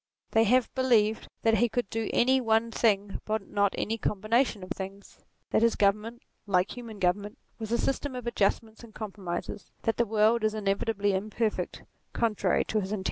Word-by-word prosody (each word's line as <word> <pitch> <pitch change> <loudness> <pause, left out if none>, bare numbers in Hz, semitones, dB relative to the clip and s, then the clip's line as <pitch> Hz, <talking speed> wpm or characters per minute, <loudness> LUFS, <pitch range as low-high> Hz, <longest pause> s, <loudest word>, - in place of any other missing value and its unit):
They 225 0 +4
have 250 +3 +2
believed 225 -5 +2 0.2
that 225 -2 +3
he 240 +1 +3
could 240 0 -1
do 225 -1 -2
any 260 +2 +3
one 225 0 +2
thing, 205 -4 +1
but 215 -2 -2
not 200 -1 +1
any 225 +2 -2
combination 215 +1 0
of 185 - -10
things: 195 +1 -7 0.3
that - - +3
his 230 0 +3
government, 210 +4 0 0.2
like 185 -1 +1
human 230 -3 -8
government, 205 +4 0 0.2
was 220 -1 -5
a 235 - +3
system 270 +1 -1
of 250 -1 -6
adjustments 220 0 -1
and 225 -2 -14
compromises; 195 -3 -5
that 225 - 0
the 235 - +2
world 220 +2 +3
is 215 0 +1
inevitably 205 0 0
imperfect, 215 +3 -2 0.3
contrary 210 -5 +1
to 215 - 0
his 190 +1 -5
intention. 210 - -1
220 Hz, 180 wpm, -28 LUFS, 200-230 Hz, 0.3 s, They